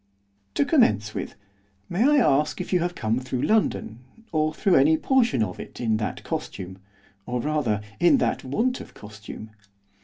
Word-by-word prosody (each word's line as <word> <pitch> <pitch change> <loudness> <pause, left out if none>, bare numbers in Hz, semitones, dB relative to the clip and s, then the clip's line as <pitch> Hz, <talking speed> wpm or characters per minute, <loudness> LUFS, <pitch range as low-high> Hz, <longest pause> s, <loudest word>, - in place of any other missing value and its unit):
'To 140 - +2
commence 110 - +3
with, - - -5 0.5
may 180 - -2
I 295 - +4
ask 150 - +2
if 185 - -4
you 180 - +4
have 175 +1 -2
come 110 +2 0
through 130 0 -3
London, 210 - 0 0.3
or 155 -1 +1
through 190 +4 +1
any 155 +3 +5
portion 240 - +2
of 90 -4 -5
it, - - -9
in 110 -3 +1
that 110 - -4
costume, 95 0 -5 0.5
or, 125 0 -2
rather, 120 -7 0 0.2
in 175 +11 +5
that - - 0
want 230 - -1
of - - -13
costume? 105 +1 -10
140 Hz, 165 wpm, -25 LUFS, 110-180 Hz, 0.5 s, any